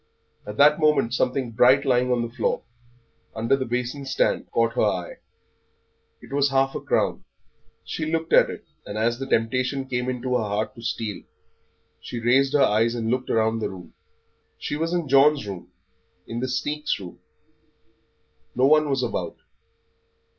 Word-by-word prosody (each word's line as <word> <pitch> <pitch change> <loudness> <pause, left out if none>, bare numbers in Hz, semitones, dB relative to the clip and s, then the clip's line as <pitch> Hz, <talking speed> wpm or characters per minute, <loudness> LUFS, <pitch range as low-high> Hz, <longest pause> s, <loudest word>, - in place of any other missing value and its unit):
At 105 +1 -7
that 150 +2 +6
moment 150 -6 +2
something 125 -1 0
bright 125 +4 +4
lying 125 -1 +2
on 120 -1 +1
the 115 0 -6
floor, - - -1 0.7
under 115 +4 +2
the 130 -1 -3
basin 125 +3 -3
stand, 135 - 0
caught 115 0 +1
her - - 0
eye. 95 -5 -1 1.1
It - - -11
was 140 0 +2
half 135 0 +1
a - - -4
crown. - - 0 0.6
She 155 - -4
looked 165 0 -2
at - - +6
it, - - -8 0.2
and 100 - -7
as 115 +2 0
the 135 - -4
temptation 130 +4 0
came 125 -1 -2
into 125 0 -3
her 115 - -1
heart 105 +1 -2
to 115 - -13
steal, 115 -3 -3 0.8
she 120 - -6
raised 135 +4 +3
her 145 - +5
eyes 115 +3 +2
and 115 -1 -2
looked 130 0 -1
round 110 0 +1
the - - -1
room. 95 -2 -11 0.6
She - - -4
was 165 +2 -2
in 175 -3 -1
John's 140 -1 +4
room 95 -3 -8 0.5
in 115 - -5
the 130 - -2
sneak's 145 +1 -2
room. 90 -3 -10 1.4
No 125 - +3
one 155 +1 +4
was 135 -2 0
about. 120 - -3
125 Hz, 170 wpm, -24 LUFS, 115-140 Hz, 1.4 s, that